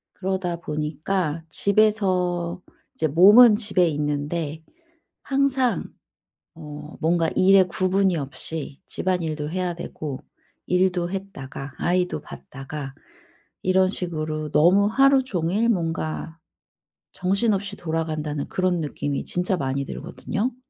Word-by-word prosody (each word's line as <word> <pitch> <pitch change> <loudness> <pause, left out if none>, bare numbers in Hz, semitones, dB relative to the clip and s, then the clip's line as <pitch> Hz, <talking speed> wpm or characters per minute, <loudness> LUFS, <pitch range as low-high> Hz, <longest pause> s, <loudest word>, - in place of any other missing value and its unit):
그러다 190 -2 -2
보니까 155 +1 -2
집에서 185 -4 +1 0.3
이제 160 - 0
몸은 205 - +8
집에 205 -5 +2
있는데 150 +1 -2 0.6
항상 270 -2 +1 0.7
어 150 -1 -9
뭔가 165 0 +2
일에 195 +1 +6
구분이 185 0 +1
없이 140 +1 -4
집안일도 160 -5 -2
해야 180 0 -2
되고 155 -5 -6 0.5
일도 180 -1 +1
했다가 145 -8 -7
아이도 180 -2 0
봤다가 135 -1 -8 0.7
이런 185 0 +3
식으로 155 -5 -3
너무 175 +7 +5
하루 270 +4 +4
종일 195 +1 0
뭔가 165 -4 -2 0.7
정신없이 200 +1 0
돌아간다는 155 -3 -3
그런 185 -2 0
느낌이 145 -2 -3
진짜 180 +1 0
많이 140 -2 -2
들거든요. 230 - -4
175 Hz, 245 characters per minute, -24 LUFS, 155-190 Hz, 0.7 s, 몸은